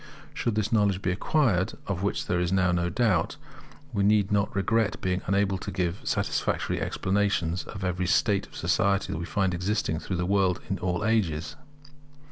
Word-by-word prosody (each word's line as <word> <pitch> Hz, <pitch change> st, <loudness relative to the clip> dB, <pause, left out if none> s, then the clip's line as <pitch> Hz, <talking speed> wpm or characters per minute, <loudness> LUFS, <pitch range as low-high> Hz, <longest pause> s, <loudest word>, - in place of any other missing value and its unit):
Should 115 Hz, -, -1 dB
this 110 Hz, 0 st, 0 dB
knowledge 100 Hz, -4 st, +2 dB
be 90 Hz, -, +1 dB
acquired, 105 Hz, -, +1 dB
of 95 Hz, -3 st, -3 dB
which 100 Hz, -, -1 dB
there 90 Hz, -3 st, 0 dB
is 90 Hz, 0 st, 0 dB
now 90 Hz, -1 st, +3 dB
no 85 Hz, 0 st, 0 dB
doubt, 95 Hz, -4 st, +1 dB, 0.6 s
we 100 Hz, -, 0 dB
need 105 Hz, 0 st, +3 dB
not 100 Hz, 0 st, +1 dB
regret 105 Hz, +2 st, +1 dB
being 90 Hz, 0 st, -1 dB
unable 100 Hz, 0 st, +1 dB
to -, -, -6 dB
give 90 Hz, 0 st, -2 dB
a -, -, -12 dB
satisfactory -, -, -1 dB
explanation 95 Hz, -4 st, 0 dB
of 95 Hz, -, -7 dB
every 90 Hz, -1 st, -1 dB
state 100 Hz, +1 st, +2 dB
of -, -, -17 dB
society 100 Hz, 0 st, +1 dB
that 80 Hz, -, -3 dB
we 85 Hz, -, -4 dB
find 95 Hz, -1 st, 0 dB
existing 90 Hz, -2 st, -1 dB
throughout 90 Hz, +1 st, -4 dB
the 90 Hz, -, -1 dB
world 95 Hz, -2 st, +2 dB
in 95 Hz, -, -1 dB
all 90 Hz, +3 st, -1 dB
ages. 80 Hz, -9 st, 0 dB
95 Hz, 185 wpm, -27 LUFS, 90-105 Hz, 0.6 s, now